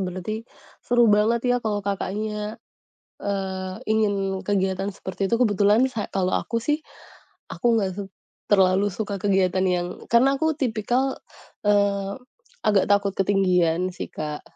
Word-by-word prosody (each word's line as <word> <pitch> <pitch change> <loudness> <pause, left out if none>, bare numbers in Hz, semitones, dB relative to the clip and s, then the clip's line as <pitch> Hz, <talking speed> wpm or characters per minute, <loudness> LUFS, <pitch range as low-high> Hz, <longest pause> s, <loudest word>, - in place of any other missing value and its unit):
berarti, 185 +2 -4 0.5
seru 240 -1 +3
banget 220 +3 +3
ya 245 - +4
kalau 205 -3 -2
Kakaknya, 210 +2 -3 0.7
eee, 190 -2 -3
ingin 200 -3 0
kegiatan 195 -1 0
seperti 190 0 -4
itu. 230 - +2
Kebetulan 210 +1 +4
sa 215 - -3
kalau 185 -1 0
aku 230 - -1
sih, 295 +7 0 0.7
aku - - -7
enggak 195 -3 0
suk 195 -1 -5 0.4
terlalu 195 0 +4
suka 205 -1 -3
kegiatan 190 -2 +2
yang 175 -1 0 0.2
karena 265 +4 +5
aku 315 -1 +1
tipikal, 250 +1 0 0.5
eee, 200 -1 +2 0.5
agak 200 -3 +4
takut 200 -1 +2
ketinggian, 185 -3 +2
sih - - -6
Kak. 150 -1 -5
200 Hz, 130 wpm, -24 LUFS, 190-215 Hz, 0.7 s, karena